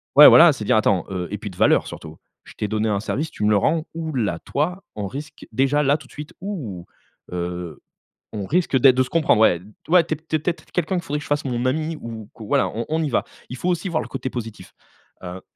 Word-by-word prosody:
Ouais, 150 - +11
voilà, 165 -1 +8
c'est 120 - -6
dire 110 - +3
attends 100 -5 +2
heu 90 -2 -3
et 105 - -2
puis 105 - -6
de 90 - -15
valeurs - - +3
surtout, 80 -1 -9 0.3
je - - -13
t'ai 105 - -3
donné 110 +1 0
un 100 -2 +1
service, 145 +8 -3
tu 105 - -6
me 105 - +4
le 105 - +5
rends, 155 - +1
où 160 -1 -4
là 105 -10 -1
toi, 180 - -2
on 105 -2 -3
risque 145 +8 -8
déjà 135 +3 +2
là 145 +1 +3
tout 155 - -15
de - - -21
suite, 150 0 -8
ou, 130 - -5 0.5
heu, 90 -2 -5 0.5
on 105 -3 -4
risque 170 -4 +2
d'être 130 0 +6
de 130 - +3
se 125 - -9
comprendre, 155 -9 +3
ouais. 90 -6 +4 0.3
Ouais, 175 0 +6
tu 165 - -2
es - - -13
tu 160 0 -4
es - - +2
peut-être 170 +3 -3
quelqu'un, 180 +1 -1
qu'il 175 - -2
faudrait 150 -1 -3
que 145 - -9
je - - -10
fasse 145 0 0
mon 125 -2 -2
ami, 155 +4 -1
ou 110 -2 -8
que 110 - -10
voilà, 105 - +1
on 115 +2 -4
on 160 +1 0
y 150 - -1
va. 120 - +1 0.3
Il 125 - -6
faut 180 - -1
aussi 180 +2 -1
voir 160 -2 0
le - - -7
côté 130 -1 -4
positif, 115 -3 -7 0.5
heu 90 +1 -7
130 Hz, 260 wpm, -22 LUFS, 105-155 Hz, 0.5 s, Ouais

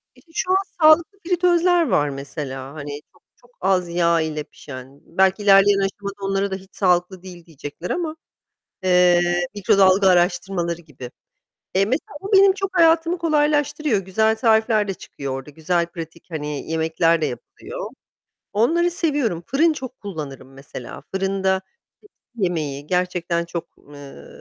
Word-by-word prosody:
İşte, 330 - -23
şu 365 +1 -1
an 380 - +5 0.2
sağlıklı 325 +6 +5
fritözler 350 -1 +3
var, 145 0 +2
mesela, 135 -1 -6
hani, 145 -1 -7
çok - - -28
çok 245 0 -25
az 185 -2 +1
yağ 170 -1 +2
ile 155 -1 -3
pişen. 135 -1 -12
Belki 190 +3 +1
ilerleyen 200 0 +6
aşamada 200 +1 -3
onlara 195 0 0
da - - -1
hiç 190 0 -13
sağlıklı 180 -1 +1
değil 175 -3 -11
diyecekler 155 +2 -8
ama, 325 -3 -2 0.7
eee, 175 -1 +3
mikrodalga 195 -1 +4
araştırmaları 175 -1 +1
gibi. 130 -6 -11 0.6
Eee, 195 +1 +4
mesela, 265 +5 -3
bu 400 +2 -6
benim 390 0 +7
çok 390 -1 -3
hayatımı 330 +1 +4
kolaylaştırıyor. 295 - +1
Güzel 220 +4 +1
tarifler 220 -2 +2
de 195 - -2
çıkıyor 140 -5 -7
orada, 135 +2 -7
güzel 170 +3 -1
pratik, 165 -1 -10
hani, 150 -1 -5
yemekler 160 +1 +1
de 155 - +1
yapılıyor. 120 -3 -7 0.6
Onları 335 +12 +2
seviyorum. 285 - -1
Fırın 310 +6 +3
çok 260 -3 -8
kullanırım 145 - -8
mesela. 135 -2 -9
Fırında 190 0 0 0.4
tepsi 415 - -23 0.2
yemeği 155 -8 -2
gerçekten 180 -2 -1
çok, 170 -1 -5 0.3
eee, 140 - -12
185 Hz, 145 wpm, -21 LUFS, 160-245 Hz, 0.7 s, benim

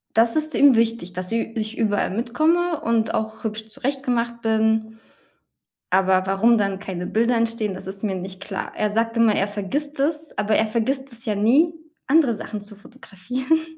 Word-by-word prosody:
Das 230 +1 +4
ist 310 0 +2
ihm 280 -3 +6
wichtig, 225 -5 0
dass 180 +2 -5
ü - - 0 0.2
ich 215 0 -4
überall 205 -2 +1
mitkomme 310 - +1
und 230 -1 0
auch 220 0 -3
hübsch 220 0 -4
zurechtgemacht 245 -2 -2
bin. 220 0 0 0.9
Aber 190 0 +3
warum 220 +5 +3
dann 195 -2 -1
keine 180 -3 -5
Bilder 235 +4 +1
entstehen, 230 -3 0
das 185 - -7
ist 195 +1 -5
mir 200 -3 -1
nicht 185 +1 -7
klar. 195 -1 -5
Er 210 0 0
sagt 230 +2 0
immer, 230 -2 +4
er 195 - +1
vergisst 270 +9 -3
es, 300 +2 -1
aber 210 +1 +1
er 220 - +3
vergisst 260 +5 -1
es 235 0 -2
ja 215 -3 -1
nie, 265 +11 +4 0.4
andere 280 -4 +4
Sachen 210 0 -6
zu 205 +1 -10
fotografieren. 250 - -3
225 Hz, 180 wpm, -22 LUFS, 205-250 Hz, 0.9 s, ihm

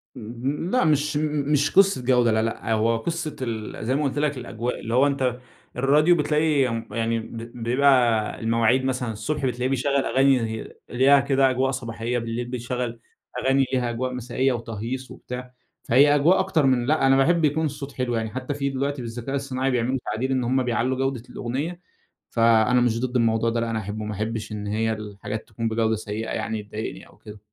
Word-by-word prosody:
امم، 125 +9 -4
لأ 255 -8 +3
مش 150 -1 +2
م 150 -1 -1
مش 145 -1 +2
قصة 195 -7 +4
جودة 125 -2 +4
لأ 110 0 +2
لأ، 115 0 -2
هو 115 +1 +2
قصة 155 +4 -3
ال 110 -3 -4
زي 130 +3 +1
ما 150 - 0
قُلت 140 0 -1
لك 150 -2 0
الأجواء، 120 0 -4
اللي 115 - -5
هو 130 +4 +5
أنت 130 -3 -1 0.4
الراديو 150 +7 +4
بتلاقي 150 -3 +2
م 115 0 -4
يعني 115 +1 0
ب 115 +1 -8 0.3
بيبقى 120 -3 +3
المواعيد 115 +3 +2
مثلًا 125 -3 -1
الصبح 135 +7 -3
بتلاقيه 125 0 -1
بيشغّل 135 +1 +1
أغاني 135 0 +3
هي 110 -1 -5 0.2
ليها 135 +3 +5
كده 135 -1 +3
أجواء 130 +1 +1
صباحية، 120 -1 -3
بالليل 115 +1 -3
بيشغّل 120 -1 -4 0.4
أغاني 135 +1 +2
ليها 125 -2 +1
أجواء 125 +2 -3
مسائية 125 +2 0
وتهييص 120 +3 -5
وبتاع، 125 0 -8 0.3
فهي 145 +5 +5
أجواء 155 +6 +4
أكتر 185 -6 +1
من 130 -2 +2
لأ، 145 0 +2
أنا 135 0 +5
باحب 165 +4 +3
يكون 155 +2 +1
الصوت 140 -1 -5
حلو، 125 -2 -2
يعني 110 -1 -2
حتى 130 +5 -4
في 140 -1 -2
دلوقتي 140 0 -2
بالذكاء 120 +3 -5
الصناعي 135 -1 -1
بيعملوا 125 +1 0
تعديل 130 +4 -2
إن 130 -1 +1
هُم 130 +2 +1
بيعلّوا 125 +1 0
جودة 135 -3 -1
الأغنية، 145 +9 -4 0.5
فأنا 115 +1 +4
مش 115 -2 +1
ضد 130 0 -3
الموضوع 115 -1 +2
ده 115 0 -1
لأ، 115 0 -1
أنا 115 -1 -1
أحبه 110 +1 -5
ما 105 - -4
احبِّش 110 +2 -4
إن 105 -1 -5
هي 110 +2 0
الحاجات 105 0 -6
تكون 115 +1 -3
بجودة 110 0 +1
سيئة 110 +1 -5
يعني 110 -2 -3
تضايقني 105 +1 -6
أو - - -21
كده. 105 0 -12
125 Hz, 190 wpm, -24 LUFS, 115-135 Hz, 0.5 s, هو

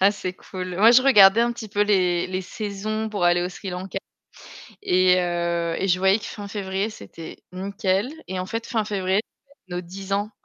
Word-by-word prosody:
Ah, 195 +1 +6
c'est 185 -3 -4
cool. 185 0 -7
Moi 220 +5 +7
je 245 +1 +6
regardais 215 -5 +7
un 240 0 +2
petit 230 -2 -8
peu 205 +1 +1
les 180 -4 +2
les 185 0 -3
saisons 215 +2 -4
pour 200 -4 -1
aller 175 0 +4
au 180 - -1
Sri 190 +2 -8
Lanka 185 +2 -5 0.8
et 185 - +4
heu, 170 -1 -1
et 195 - -1
je 180 0 +3
voyais 190 +3 +4
que - - -10
fin 205 -1 -7
février 195 +1 -2
c'était 165 -6 -11
nickel. 195 +2 -1 0.2
Et 185 - -3
en 185 - -3
fait 225 +4 -4
fin 220 -3 -1
février, 195 -1 0 0.3
c'est 195 -10 -13
nos 175 - -2
10 190 +2 -8
ans 205 +2 0
195 Hz, 205 wpm, -23 LUFS, 180-210 Hz, 0.8 s, Moi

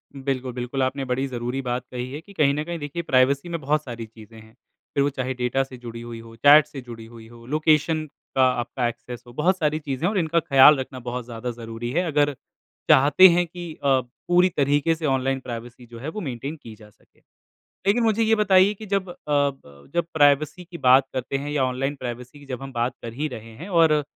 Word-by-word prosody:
बिल्कुल-बिल्कुल, 130 -1 -3
आपने 135 +1 -2
बड़ी 130 +2 -1
ज़रूरी 125 +1 -3
बात 125 0 -3
कही 125 +1 -5
है 150 +3 -6
कि 200 +3 -16
कहीं 140 -5 +3
ना 150 +1 -2
कहीं, 170 0 -5
देखिए, 145 +4 -4
प्राइवेसी 140 +4 +2
में 170 -1 -3
बहुत 150 +2 0
सारी 120 -3 -7
चीज़ें 110 0 -15
हैं, 110 0 -17 0.4
फिर 140 - +2
वो 145 - +2
चाहे 130 -1 -3
डाटा 125 +2 0
से 130 -1 -11
जुड़ी 115 -1 -8
हुई 120 -1 -8
हों, 115 0 -13
चैट 145 +5 +7
से 140 -3 -8
जुड़ी 115 -2 -10
हुई 115 -1 -13
हों, 115 0 -15
लोकेशन 155 +1 +2 0.3
का 130 - +4 0.2
आपका 120 0 -2
एक्सेस 120 +1 -7
हो, 120 - -13
बहुत 180 +7 +1
सारी 155 -1 0
चीज़ें 145 +1 -3
हैं। - - +1
और 200 - -1
इनका 170 0 +1
ख़्याल 145 -2 +7
रखना 130 0 -6
बहुत 125 0 -4
ज़्यादा 120 +1 -5
ज़रूरी 115 0 -6
है, 175 +7 +1
अगर 145 -2 +1 0.5
चाहते 145 +8 +7
हैं 175 +1 +3
अ, - - -17
कि 175 -3 -7
पूरी 140 +8 +2
तरीके 145 +3 +2
से 160 -1 -5
ऑनलाइन 135 -1 0
प्राइवेसी 120 0 -8
जो 115 -1 -11
है, 145 +6 -5
वो 210 +6 -6
मेंटेन 135 +2 -5
की 110 -2 -10
जा 105 0 -16
सके। - - -31 0.7
लेकिन 225 +4 +3
मुझे 225 0 +2
ये 225 0 +4
बताइए 195 -2 +4
कि 215 +2 -10
जब 195 -2 -1
अ, - - -8
ब, 140 - -1
प्राइवेसी 150 +4 +3
की 170 0 -10
बात 130 0 +5
करते 130 +1 -3
हैं, 145 +2 -5
या 145 -3 +1
ऑनलाइन 130 +2 -1
प्राइवेसी 125 +2 -7
की 145 - -15
जब 130 -1 -6
हम 135 - -7
बात 120 +1 -1
कर 115 - -6
ही 150 +5 -3
रहे 115 -4 -9
हैं, 175 +7 -9
और 160 -4 +4
135 Hz, 225 wpm, -24 LUFS, 120-155 Hz, 0.7 s, चैट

